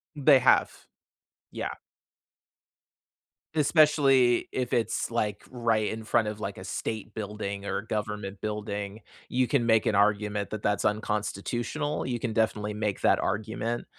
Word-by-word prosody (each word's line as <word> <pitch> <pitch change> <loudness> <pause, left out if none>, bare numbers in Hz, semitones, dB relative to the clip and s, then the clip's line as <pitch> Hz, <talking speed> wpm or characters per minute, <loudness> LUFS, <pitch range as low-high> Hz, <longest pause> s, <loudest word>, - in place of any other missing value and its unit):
They 140 -2 +6
have. - - +3 0.7
Yeah. - - -4 1.8
Especially, 145 -5 +4
if 125 -1 -2
it's, 115 -2 0
like, 105 -3 -2
right 115 -4 +1
in 110 0 -5
front 110 0 +2
of, 105 0 -4
like, 100 -2 -5
a 95 - -8
state 110 +3 -4
building, 100 -2 -4
or - - -1
a 110 - -10
government 105 -2 -4
building, 105 -1 -4 0.3
you 125 0 +1
can 130 -5 +1
make 110 -2 +3
an 105 - +2
argument 105 0 +1
that 110 - -4
that's 105 -1 0
unconstitutional. 110 +7 -2
You 120 -2 -2
can 115 -1 -2
definitely 105 -1 0
make 105 -2 -2
that - - +4
argument. 110 +3 -2
110 Hz, 140 wpm, -28 LUFS, 105-120 Hz, 1.8 s, They